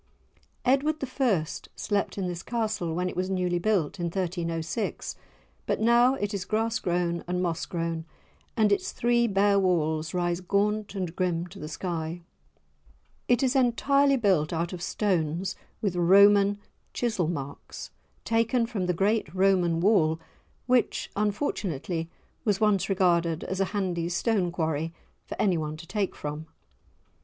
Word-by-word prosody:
Edward 275 +4 +3 0.3
I. 200 -12 +3 0.3
slept 205 -1 -1
in 195 - -1
this 175 -1 -4
Castle 215 -8 -2
when 180 +1 0
it - - -5
was 185 +1 -1
newly 180 -2 0
built, 190 -4 0
in 175 - -1
1306; 170 +1 -3 0.5
but - - 0
now 240 +3 +5
it 205 -3 -3
is 195 -2 -2
grass 220 +2 0
grown 175 -2 -1
and 180 0 -1
moss 170 -3 -1
grown, 165 -1 -3 0.5
and 215 -2 +4
its 200 - +1
three 235 0 +2
bare 200 -1 +3
walls 160 -4 +1
rise 175 0 0
gaunt 205 +3 0
and 180 -3 -3
grim 175 -2 0
to - - -12
the 150 - -6
sky. 165 +1 -4 1.0
It 245 +1 +3
is 260 +1 +2
entirely 275 +2 +3
built 185 -10 +2
out 170 +1 -2
of 175 - -6
stones 180 -3 -1 0.3
with 195 -4 0
Roman 200 +3 +6 0.4
chisel 220 -9 0
marks, 140 -4 -6 0.3
taken 230 +1 +2
from 210 -6 -3
the 180 - +1
great 210 +5 +1
Roman 185 -3 +3
wall, 165 -6 +3 0.5
which 250 -1 +1
unfortunately 190 - -2 0.3
was 205 -3 +1
once 210 -3 +2
regarded 170 -4 +2
as 190 - -4
a 195 - +3
handy 180 -5 -2
stone 185 -1 +1
quarry 160 -1 -2 0.3
for - - -7
anyone 160 -6 0
to 165 - -10
take 200 +2 -2
from. 150 +2 -6
185 Hz, 145 wpm, -27 LUFS, 170-210 Hz, 1.0 s, Roman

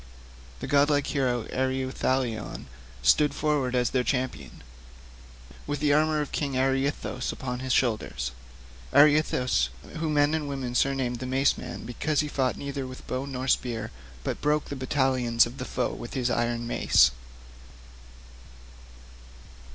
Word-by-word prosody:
The - - -3
godlike 145 0 +3
hero 125 -6 0
Ereuthalion 130 -3 -1 0.4
stood 140 - +4
forward 145 -4 0
as 125 -1 +1
their 130 -1 +1
champion, 125 - -3 1.0
with 145 -1 -2
the 145 -1 +3
armour 155 0 +3
of 145 - -4
King 140 -2 -2
Areithous 135 0 0
upon 125 -1 -5
his 130 0 -3
shoulders—Areithous 65 - +1 0.3
whom 155 -1 -1
men 145 +1 +3
and 155 -2 -1
women 135 -3 -3
had 120 - -1
surnamed 130 -3 0
'the 130 - -4
Mace 135 +2 +2
man,' - - -7
because 145 +6 0
he 150 - -3
fought 130 -3 0
neither 140 -1 -4
with 130 0 -10
bow 130 +2 -3
nor 130 -1 -4
spear, 115 -4 0 0.3
but - - -3
broke 150 0 +1
the 140 - -4
battalions 130 -3 +2
of 120 +3 -9
the 125 - -4
foe 125 - -2
with 120 - -8
his 125 -2 0
iron 120 0 0
mace. 90 - +4
130 Hz, 140 wpm, -27 LUFS, 120-145 Hz, 1.0 s, stood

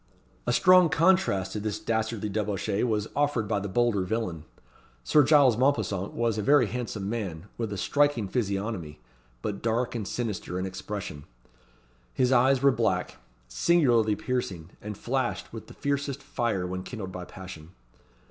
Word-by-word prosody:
A - - +3
strong 180 +6 +6
contrast 165 - +2
to 105 - -3
this 105 0 -2
dastardly 110 -1 -2
debauchee 105 0 -1
was 110 -3 0
offered 145 -6 +1
by 100 - 0
the 100 +1 -4
bolder 115 0 +2
villain. 90 -6 -3 0.6
Sir 150 - +5
Giles 135 -5 +5
Mompesson 110 -8 0
was 115 -2 0
a - - 0
very 140 +2 +5
handsome 110 -3 -4
man, 100 -7 -4
with 115 -3 -3
a 100 - -3
striking 145 -2 +1
physiognomy, 100 - -3 0.4
but 100 -2 -3
dark 115 +2 0
and 110 -5 -4
sinister 105 -6 -3
in 95 - -2
expression. 95 -5 -6 0.9
His 130 0 +2
eyes 130 +1 +4
were 140 - +7
black, 110 -6 -1 0.3
singularly 115 - +3
piercing, 95 -11 -3
and 105 -1 -6
flashed 130 -2 -2
with 115 - -8
the - - -13
fiercest 140 -1 -2
fire 110 -7 -1
when 90 +1 -4
kindled 95 -2 -6
by 90 -1 -6
passion. 90 -4 -10
110 Hz, 155 wpm, -27 LUFS, 95-125 Hz, 0.9 s, were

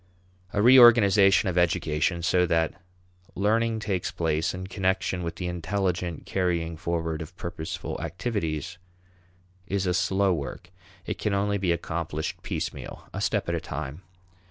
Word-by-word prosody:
A 105 - +1
reorganization 110 -5 +7
of 90 -1 +1
education 85 0 +1
so 90 +1 +3
that 80 0 +1 0.6
learning 110 +3 +1
takes 95 -4 -1
place 80 -2 0
in 90 0 -6
connection 95 -1 -1
with 85 -1 -4
the 90 - -5
intelligent 90 -1 -2
carrying 85 -3 -1
forward 80 -1 -2
of 90 +3 -9
purposeful 80 -2 -5
activities 85 - -3 0.9
is 95 0 -1
a 90 - +1
slow 95 +2 +2
work. 80 +4 -6 0.3
It - - -4
can 105 -2 0
only 100 +1 0
be 95 -2 +1
accomplished 80 -2 -3
piecemeal, - - -5
a - - -4
step - - 0
at - - -1
a - - -1
time. 75 +2 -6
90 Hz, 140 wpm, -26 LUFS, 85-100 Hz, 0.9 s, reorganization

